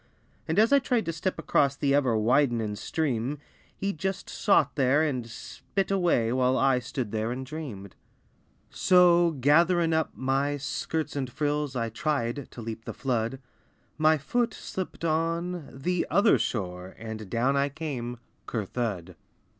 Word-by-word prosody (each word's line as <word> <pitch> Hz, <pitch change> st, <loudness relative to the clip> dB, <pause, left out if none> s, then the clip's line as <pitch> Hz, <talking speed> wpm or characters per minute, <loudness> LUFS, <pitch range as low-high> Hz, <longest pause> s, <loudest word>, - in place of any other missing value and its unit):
And 160 Hz, -, -1 dB
as 225 Hz, +5 st, +5 dB
I 280 Hz, -, +7 dB
tried 250 Hz, -4 st, 0 dB
to 165 Hz, -, -2 dB
step 175 Hz, +4 st, -2 dB
across 140 Hz, -1 st, +2 dB
The 140 Hz, 0 st, +1 dB
ever 130 Hz, -6 st, +3 dB
widenin' 115 Hz, -2 st, +2 dB
stream, 135 Hz, +2 st, -2 dB, 0.4 s
He 200 Hz, 0 st, -1 dB
just 190 Hz, +4 st, -4 dB
sot 175 Hz, -, +3 dB
there 140 Hz, +2 st, +3 dB
and 130 Hz, -6 st, -2 dB
spit 195 Hz, -, -4 dB
away, 170 Hz, -12 st, +2 dB
While 130 Hz, 0 st, +2 dB
I 135 Hz, -2 st, +3 dB
stood 125 Hz, -3 st, -4 dB
there 110 Hz, +1 st, -1 dB
and 130 Hz, +2 st, -4 dB
dreamed. 130 Hz, -, -7 dB, 0.8 s
So 175 Hz, -3 st, +4 dB
gatherin' 165 Hz, +5 st, +4 dB
up 160 Hz, 0 st, +1 dB
my 135 Hz, +2 st, 0 dB
skirts 155 Hz, +3 st, -3 dB
and 130 Hz, -3 st, -3 dB
frills 145 Hz, 0 st, -1 dB
I 115 Hz, -2 st, -1 dB
tried 140 Hz, 0 st, -2 dB
to 120 Hz, -, -9 dB
leap 115 Hz, 0 st, -6 dB
the -, -, -6 dB
flood; 120 Hz, -1 st, -1 dB, 0.6 s
My 155 Hz, 0 st, +5 dB
foot 230 Hz, -, -1 dB
slipped 185 Hz, -2 st, -5 dB
on 165 Hz, +1 st, -1 dB
the 175 Hz, +7 st, -1 dB
"other 205 Hz, +2 st, +4 dB
shore" 90 Hz, -4 st, -3 dB
And 110 Hz, -2 st, -7 dB
down 125 Hz, +6 st, +1 dB
I 140 Hz, +1 st, +2 dB
came 130 Hz, -5 st, -5 dB, 0.3 s
"cur 110 Hz, -4 st, -2 dB
thud." 95 Hz, -6 st, -4 dB
140 Hz, 155 wpm, -27 LUFS, 120-165 Hz, 0.8 s, I